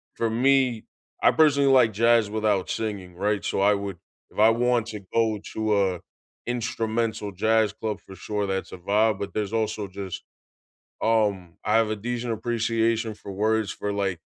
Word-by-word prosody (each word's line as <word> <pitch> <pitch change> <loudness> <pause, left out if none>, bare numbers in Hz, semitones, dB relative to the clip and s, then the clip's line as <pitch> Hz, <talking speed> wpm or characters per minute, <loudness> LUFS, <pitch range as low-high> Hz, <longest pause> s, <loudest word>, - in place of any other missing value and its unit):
for 115 - 0
me, 125 0 +2 0.4
I - - +6
personally 140 -3 +4
like 125 -5 +5
jazz 115 0 +3
without 105 -3 0
singing, 100 -5 -4
right? 100 +2 -1
So - - -1
I 100 +1 +5
would 100 -2 -5 0.3
If - - -9
I 110 +1 +7
want 120 0 +1
to 110 -2 -6
go 110 -2 +2
to 110 -2 +1
a 90 - -8 0.5
instrumental 115 -3 -2
jazz 110 +2 +2
club, 110 -1 -4
for 95 - -11
sure, 105 +3 -3
that's 95 0 -3
a - - -6
vibe, 105 +3 +1
but 100 - -5
there's 105 -1 -2
also 110 -2 -1
just 95 0 -7 0.8
Um, 100 -6 +1
I 105 - +1
have 115 -1 +3
a 110 - -1
decent 120 +2 -3
appreciation 115 0 0
for 100 -1 -9
words 110 +1 0
for, 105 - -4
like 95 -4 -2
110 Hz, 170 wpm, -25 LUFS, 100-115 Hz, 0.8 s, I